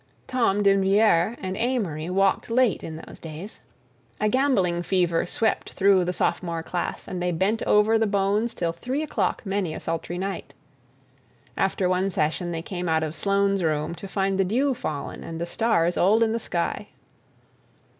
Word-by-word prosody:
Tom 230 Hz, -6 st, +1 dB
D'Invilliers 195 Hz, +1 st, +3 dB
and 185 Hz, 0 st, -3 dB
Amory 195 Hz, -10 st, -1 dB
walked 195 Hz, +3 st, +1 dB
late 235 Hz, -4 st, +2 dB
in 160 Hz, -, -6 dB
those -, -, -12 dB
days. 165 Hz, +6 st, -8 dB, 0.6 s
A 215 Hz, -, +2 dB
gambling 210 Hz, -10 st, +2 dB
fever 175 Hz, -2 st, +1 dB
swept 220 Hz, +4 st, -1 dB
through 195 Hz, -2 st, +4 dB
the 180 Hz, -, 0 dB
sophomore 170 Hz, -2 st, -1 dB
class 175 Hz, +1 st, -4 dB
and 180 Hz, -1 st, -4 dB
they 180 Hz, 0 st, 0 dB
bent 190 Hz, +7 st, 0 dB
over 215 Hz, +2 st, +4 dB
the 220 Hz, -, +2 dB
bones 205 Hz, +3 st, +1 dB
till 170 Hz, -1 st, -1 dB
three 255 Hz, -, -3 dB
o'clock 305 Hz, -, -1 dB
many 195 Hz, -5 st, -1 dB
a -, -, -5 dB
sultry 165 Hz, +1 st, -3 dB
night. 195 Hz, +1 st, -5 dB, 1.0 s
After 190 Hz, -1 st, +1 dB
one 185 Hz, +2 st, +1 dB
session 175 Hz, 0 st, -1 dB
they 165 Hz, -1 st, -4 dB
came 180 Hz, -1 st, -4 dB
out 160 Hz, 0 st, +2 dB
of 155 Hz, -1 st, -3 dB
Sloane's 200 Hz, +2 st, +1 dB
room 155 Hz, 0 st, 0 dB
to 195 Hz, -, -8 dB
find 195 Hz, 0 st, -1 dB
the -, -, +5 dB
dew 255 Hz, +9 st, +1 dB
fallen 155 Hz, -, -5 dB
and 165 Hz, 0 st, -6 dB
the 170 Hz, -, -1 dB
stars 175 Hz, -3 st, +1 dB
old 215 Hz, +5 st, +4 dB
in 220 Hz, -, +1 dB
the 230 Hz, -, -1 dB
sky. 170 Hz, -6 st, -2 dB
190 Hz, 170 wpm, -25 LUFS, 170-215 Hz, 1.0 s, the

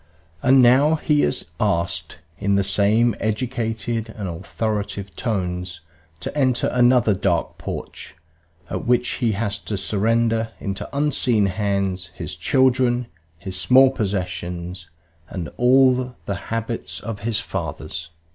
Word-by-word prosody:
And 130 Hz, 0 st, +6 dB
now 135 Hz, +6 st, +5 dB
he 150 Hz, -1 st, +2 dB
is 75 Hz, -, 0 dB
asked, 85 Hz, -1 st, -1 dB, 0.2 s
in 100 Hz, 0 st, +1 dB
the 100 Hz, -, +3 dB
same 105 Hz, +4 st, +3 dB
educated 115 Hz, 0 st, -2 dB
and 100 Hz, -3 st, -4 dB
authoritative 100 Hz, +1 st, -3 dB
tones, 90 Hz, -6 st, -3 dB, 0.4 s
to -, -, -5 dB
enter 130 Hz, -4 st, +2 dB
another 125 Hz, -3 st, +4 dB
dark 90 Hz, -3 st, -1 dB
porch, -, -, -7 dB, 0.6 s
at -, -, -3 dB
which 125 Hz, 0 st, +3 dB
he 115 Hz, -3 st, +2 dB
has 100 Hz, -1 st, -2 dB
to 105 Hz, 0 st, -4 dB
surrender, 115 Hz, +3 st, +1 dB
into 100 Hz, -1 st, -4 dB
unseen 135 Hz, -7 st, +2 dB
hands, 100 Hz, -2 st, -1 dB
his 75 Hz, -2 st, -5 dB
children, 125 Hz, -, +2 dB, 0.3 s
his 95 Hz, +2 st, -4 dB
small 130 Hz, +1 st, +6 dB
possessions 90 Hz, -4 st, -4 dB, 0.4 s
and 85 Hz, -5 st, -5 dB
all 125 Hz, 0 st, +4 dB
the 100 Hz, -, -2 dB
habits 115 Hz, +1 st, -3 dB
of 105 Hz, -1 st, -6 dB
his 110 Hz, +1 st, 0 dB
fathers. 85 Hz, +1 st, -5 dB
110 Hz, 125 wpm, -22 LUFS, 95-125 Hz, 0.6 s, And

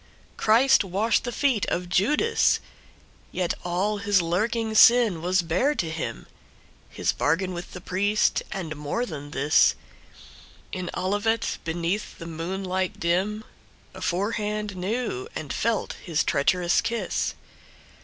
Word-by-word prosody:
Christ 230 Hz, +3 st, +4 dB
washed 200 Hz, +6 st, 0 dB
the 245 Hz, -, -2 dB
feet 250 Hz, -5 st, +1 dB
of 180 Hz, 0 st, -2 dB
Judas! 295 Hz, -, +2 dB, 0.7 s
Yet 180 Hz, -2 st, -1 dB
all 185 Hz, +4 st, 0 dB
his 205 Hz, -2 st, +3 dB
lurking 220 Hz, +6 st, 0 dB
sin 225 Hz, -6 st, +6 dB
was 180 Hz, +1 st, +1 dB
bare 185 Hz, -, +1 dB
to 165 Hz, -, -2 dB
him, 160 Hz, -1 st, -5 dB, 0.6 s
His -, -, 0 dB
bargain 180 Hz, +5 st, 0 dB
with 175 Hz, +1 st, -7 dB
the 180 Hz, -, -8 dB
priest, 205 Hz, +4 st, +1 dB
and 165 Hz, -5 st, -4 dB
more 150 Hz, +12 st, -2 dB
than 145 Hz, -7 st, -7 dB
this, 145 Hz, +2 st, +3 dB, 1.0 s
In 185 Hz, -2 st, -4 dB
Olivet, 205 Hz, +4 st, 0 dB
beneath 170 Hz, +5 st, -2 dB
the 165 Hz, -, -8 dB
moonlight 185 Hz, +3 st, -3 dB
dim, 190 Hz, +6 st, 0 dB, 0.5 s
Aforehand 210 Hz, +2 st, -2 dB
knew 190 Hz, -, -3 dB
and 150 Hz, -3 st, -4 dB
felt 230 Hz, -1 st, -1 dB
his 165 Hz, -3 st, 0 dB
treacherous 175 Hz, +5 st, +2 dB
kiss. 235 Hz, 0 st, -2 dB
190 Hz, 125 wpm, -25 LUFS, 170-215 Hz, 1.0 s, sin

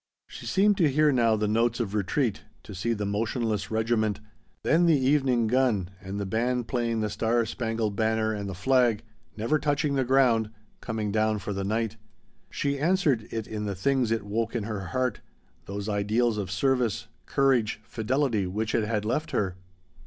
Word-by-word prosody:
She -, -, -10 dB
seemed 200 Hz, +1 st, +3 dB
to 165 Hz, -5 st, +4 dB
hear 150 Hz, +2 st, +3 dB
now 115 Hz, -4 st, +3 dB
the 105 Hz, 0 st, 0 dB
notes 115 Hz, +3 st, +1 dB
of 110 Hz, -4 st, -2 dB
retreat 105 Hz, +2 st, 0 dB, 0.2 s
to 105 Hz, -, -9 dB
see 105 Hz, +6 st, -1 dB
the 105 Hz, -2 st, -3 dB
motionless 105 Hz, 0 st, -1 dB
regiment 110 Hz, -1 st, 0 dB, 0.4 s
then 170 Hz, +2 st, +3 dB
the 155 Hz, -4 st, +4 dB
evening 130 Hz, -3 st, +2 dB
gun 110 Hz, -6 st, +1 dB
and 95 Hz, +1 st, -5 dB
the 100 Hz, -, -2 dB
band 120 Hz, +4 st, -1 dB
playing 115 Hz, -3 st, -1 dB
the 105 Hz, -, -1 dB
Star 115 Hz, +2 st, +1 dB
Spangled 110 Hz, -3 st, -2 dB
Banner 110 Hz, 0 st, +1 dB
and 100 Hz, -2 st, -4 dB
the 95 Hz, -, -5 dB
flag 120 Hz, +2 st, +2 dB, 0.3 s
never 115 Hz, +8 st, +1 dB
touching 145 Hz, 0 st, 0 dB
the 135 Hz, -1 st, +2 dB
ground 120 Hz, -4 st, +3 dB, 0.3 s
coming 110 Hz, -3 st, -3 dB
down 110 Hz, 0 st, +1 dB
for 105 Hz, 0 st, -4 dB
the 100 Hz, 0 st, -3 dB
night. 110 Hz, +2 st, -1 dB, 0.5 s
She 140 Hz, 0 st, -2 dB
answered 150 Hz, -, +2 dB
it 110 Hz, -2 st, -4 dB
in 105 Hz, -1 st, -4 dB
the 100 Hz, -, -2 dB
things 130 Hz, +4 st, +1 dB
it 115 Hz, -2 st, -1 dB
woke 115 Hz, +3 st, -2 dB
in 115 Hz, -, -1 dB
her 105 Hz, -3 st, -4 dB
heart: 130 Hz, -3 st, -1 dB, 0.4 s
those 100 Hz, +1 st, -5 dB
ideals 105 Hz, +2 st, +1 dB
of 95 Hz, -3 st, -3 dB
service, 125 Hz, +2 st, 0 dB, 0.2 s
courage, 130 Hz, -6 st, +2 dB
fidelity 115 Hz, -3 st, 0 dB
which 105 Hz, +4 st, -2 dB
it 110 Hz, -2 st, +1 dB
had 105 Hz, -2 st, -1 dB
left 150 Hz, +8 st, -1 dB
her. 95 Hz, -3 st, -1 dB
115 Hz, 180 wpm, -27 LUFS, 105-130 Hz, 0.5 s, to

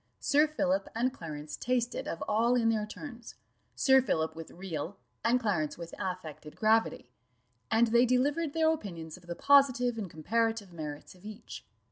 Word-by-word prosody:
Sir 295 Hz, +2 st, +4 dB
Philip 290 Hz, -1 st, 0 dB
and 250 Hz, +3 st, +1 dB
Clarence 150 Hz, -, -7 dB
tasted 245 Hz, -1 st, -1 dB
of 165 Hz, -, -4 dB
all 230 Hz, +3 st, +3 dB
in 230 Hz, -2 st, +3 dB
their 215 Hz, -2 st, 0 dB
turns; 235 Hz, 0 st, -9 dB, 0.4 s
Sir 265 Hz, -1 st, +5 dB
Philip 160 Hz, -10 st, -1 dB
with 165 Hz, -1 st, -8 dB
real, 180 Hz, 0 st, -6 dB, 0.3 s
and 235 Hz, +3 st, +3 dB
Clarence 175 Hz, -10 st, -1 dB
with 170 Hz, -1 st, -8 dB
affected 155 Hz, -5 st, -6 dB
gravity; 220 Hz, +1 st, +1 dB, 0.6 s
and 225 Hz, +2 st, +4 dB
they 235 Hz, +2 st, +4 dB
delivered 285 Hz, +5 st, +1 dB
their 320 Hz, -1 st, +3 dB
opinions 170 Hz, -, -7 dB
of 180 Hz, -1 st, -17 dB
the 170 Hz, -, -4 dB
positive 255 Hz, -3 st, +4 dB
and 200 Hz, -4 st, -4 dB
comparative 220 Hz, +4 st, -1 dB
merits 150 Hz, -3 st, -7 dB
of 180 Hz, 0 st, -20 dB
each. 215 Hz, +1 st, -9 dB
220 Hz, 160 wpm, -30 LUFS, 170-250 Hz, 0.6 s, Sir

